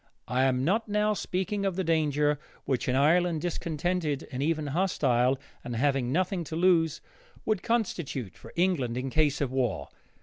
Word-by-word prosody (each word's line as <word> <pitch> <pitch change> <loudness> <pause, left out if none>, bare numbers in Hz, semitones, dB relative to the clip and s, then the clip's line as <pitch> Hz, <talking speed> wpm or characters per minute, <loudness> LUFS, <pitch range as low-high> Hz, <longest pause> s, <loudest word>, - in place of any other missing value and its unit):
I 130 +2 +2
am 130 0 +1
not 220 +7 +1
now 210 0 +2
speaking 200 +1 -2
of 195 -3 0
the 190 - -1
danger 150 -3 +1 0.3
which 130 -3 -1
an 125 - +1
Ireland 165 +4 +3
discontented, 165 -2 -2
and 130 0 -3
even 155 +1 0
hostile, 135 -6 +2 0.3
and 120 - -5
having 130 0 +1
nothing 185 +3 0
to 160 - -5
lose, 165 -3 +3 0.4
would 215 -4 +1
constitute 175 - -2
for - - -13
England 170 -10 +1
in 130 +1 -3
case 150 -1 +2
of 135 -3 0
war. 130 -5 -1
155 Hz, 165 wpm, -28 LUFS, 135-180 Hz, 0.4 s, Ireland